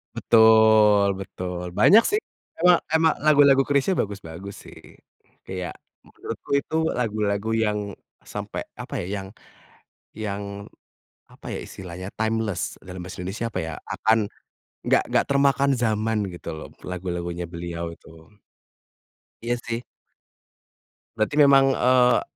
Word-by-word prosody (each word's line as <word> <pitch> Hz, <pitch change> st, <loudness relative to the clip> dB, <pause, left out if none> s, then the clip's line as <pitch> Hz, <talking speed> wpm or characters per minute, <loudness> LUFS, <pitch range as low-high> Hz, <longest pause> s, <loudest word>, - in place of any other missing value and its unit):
Betul, 110 Hz, -2 st, +5 dB
betul 90 Hz, -2 st, -6 dB
banyak 225 Hz, +3 st, +7 dB
sih, 415 Hz, +1 st, +1 dB, 0.4 s
emang 180 Hz, -1 st, +7 dB, 0.2 s
emang 160 Hz, 0 st, +4 dB
lagu-lagu 145 Hz, -2 st, +5 dB
Chrisye 140 Hz, +5 st, +2 dB
bagus-bagus 100 Hz, -1 st, -5 dB
sih, -, -, -13 dB, 0.6 s
kayak 90 Hz, -1 st, -6 dB, 0.3 s
menurutku -, -, -9 dB
itu 140 Hz, +2 st, -1 dB, 0.2 s
lagu-lagu 105 Hz, -3 st, -1 dB
yang 110 Hz, -2 st, +1 dB, 0.4 s
sampai -, -, -6 dB, 0.2 s
apa -, -, -6 dB
ya -, -, -6 dB
yang, 95 Hz, -, -8 dB, 0.9 s
yang 105 Hz, -2 st, -3 dB, 0.9 s
apa -, -, -14 dB
ya, -, -, -4 dB
istilahnya 90 Hz, 0 st, -8 dB
timeless 110 Hz, -2 st, -1 dB
dalam 90 Hz, 0 st, -8 dB
bahasa 95 Hz, +1 st, -9 dB
Indonesia 95 Hz, +6 st, -4 dB
apa -, -, -4 dB
ya, 80 Hz, -, -5 dB
akan, 110 Hz, +1 st, +1 dB, 0.7 s
enggak -, -, +3 dB
enggak -, -, +2 dB
termakan 140 Hz, 0 st, +3 dB
zaman 110 Hz, -1 st, 0 dB
gitu 85 Hz, -1 st, -8 dB
loh 80 Hz, -, -8 dB, 0.2 s
lagu-lagunya 90 Hz, -1 st, -4 dB
beliau 85 Hz, 0 st, -5 dB
itu. 80 Hz, +1 st, -17 dB, 1.1 s
Iya 120 Hz, +1 st, 0 dB
sih. 115 Hz, 0 st, -2 dB, 1.4 s
Berarti 110 Hz, +5 st, 0 dB
memang, 135 Hz, -2 st, +6 dB
eee 125 Hz, -1 st, +4 dB
110 Hz, 120 wpm, -24 LUFS, 90-125 Hz, 1.4 s, banyak